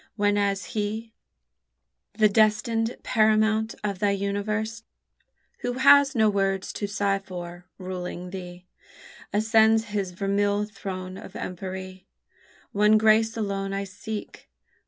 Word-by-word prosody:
whenas 205 -2 +1
he, 220 +1 -3 1.0
The 215 0 +4
destined 225 +2 +2
paramount 220 0 +2
of 200 -3 -2
thy 205 - +2
universe, 205 +3 -2 0.8
Who 245 - -2
has 280 +2 +6
no 220 -2 +4
worlds 195 -2 0
to 205 - -3
sigh 200 -1 0
for, 175 -2 -8
ruling 180 -1 -6
thee, 180 -1 -8 0.7
Ascends 220 +1 +3
his 200 -3 -1
vermeil 200 +2 0
throne 185 -3 -7
of - - -11
empery, 185 0 -6 0.7
One 210 +1 +4
grace 220 +1 +3
alone 195 -2 -2
I 195 0 -2
seek. 205 +3 -8
205 Hz, 115 wpm, -25 LUFS, 195-220 Hz, 1.0 s, has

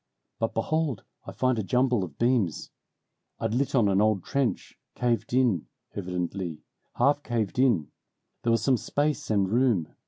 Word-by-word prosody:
But 115 - -1
behold 145 -1 0 0.2
I - - -5
find 130 -3 +1
a - - -1
jumble 125 0 +2
of 80 -6 -8
beams. 120 - +1 0.7
I'd 115 -1 -2
lit 135 +3 0
on 115 -5 +4
an 100 0 +3
old 105 -4 +2
trench, 135 -3 -2 0.2
caved 120 -2 0
in, 120 -10 +2 0.3
'vidently; 90 -3 -4 0.3
half 145 +4 +3
caved 115 -3 -2
in 115 - +2 0.5
there 115 - -1
was 115 -2 +2
some 130 +2 +3
space 145 +3 -1
and 100 -3 +2
room. 115 -6 +1
115 Hz, 155 wpm, -27 LUFS, 95-130 Hz, 0.7 s, on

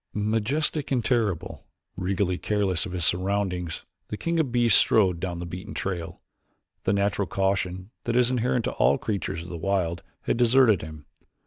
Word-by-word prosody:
Majestic 115 +9 0
and 125 -4 +1
terrible, 110 -9 -1 0.3
regally 95 0 -1
careless 100 -3 0
of - - -8
his 90 -3 0
surroundings, 90 -2 -1 0.2
the 105 - -5
king 170 +5 -1
of 145 -6 +1
beasts 120 -3 +5
strode 95 -6 +3
down 85 -1 -3
the 85 - -5
beaten 90 +5 -7
trail. 85 -3 -4 0.6
The - - +3
natural 100 -1 +1
caution 95 0 -1
that 120 0 +1
is 125 0 +3
inherent 125 -1 +1
to - - -1
all 70 +3 +3
creatures 95 -5 -3
of 85 - -10
the 85 - -5
wild 85 -2 -1 0.2
had - - -1
deserted 120 -5 +5
him. 80 -1 -9
100 Hz, 170 wpm, -26 LUFS, 90-115 Hz, 0.6 s, beasts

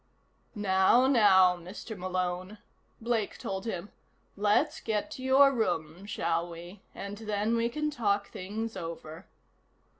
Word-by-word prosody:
"Now, 200 +4 +4
now, 190 -8 +6
Mr. 185 +6 -8
Malone," 185 +1 -3 0.4
Blake 225 -3 -1
told 190 +1 -5
him. 195 -3 -4 0.5
"Let's 205 +1 +2
get 220 +6 -2
to 265 - -7
your 270 +1 +5
room, 175 - -2
shall 170 -4 -1
we, 175 +4 -10
and 200 +1 -6
then 215 +1 -1
we 230 0 +1
can 300 +4 -2
talk 205 -6 0
things 220 +4 -5
over." 165 -1 -7
205 Hz, 125 wpm, -29 LUFS, 185-225 Hz, 0.5 s, now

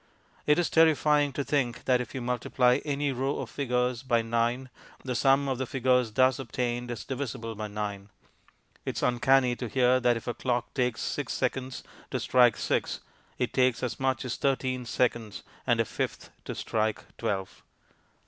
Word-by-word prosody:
It 150 +1 +5
is 175 - +2
terrifying 150 -2 +4
to 140 - -2
think 135 -5 -1
that 125 -1 +3
if 125 - -8
you 130 - -3
multiply 125 +1 +2
any 145 -1 -1
row 135 +2 -1
of - - -5
figures 125 -3 0
by 120 -3 +1
9 120 +3 -1 0.3
the 130 - -2
sum 135 +3 +3
of 130 -2 -1
the 130 - -2
figures 125 -3 +2
thus 130 +3 +3
obtained 120 -1 -2
is 115 -3 -5
divisible 125 -4 -4
by 105 0 -5
9. 105 -1 -5 0.7
It - - -4
is - - -2
uncanny 125 +1 +3
to 125 - -4
hear 130 +1 +3
that 120 -2 +3
if 115 - -9
a 120 - -2
clock 120 -1 -2
takes 125 -3 0
six 145 -5 -2
seconds 130 -1 -2 0.3
to - - -2
strike 125 -3 +4
six - - -1 0.4
it - - -1
takes 130 -2 +2
as 125 - -3
much 130 -2 0
as 125 - -3
thirteen 130 -2 -1
seconds 120 -3 -1 0.2
and - - +3
a - - +3
fifth - - -4
to - - -5
strike 110 -1 -1 0.2
twelve. 95 -2 -3
125 Hz, 175 wpm, -28 LUFS, 120-135 Hz, 0.7 s, It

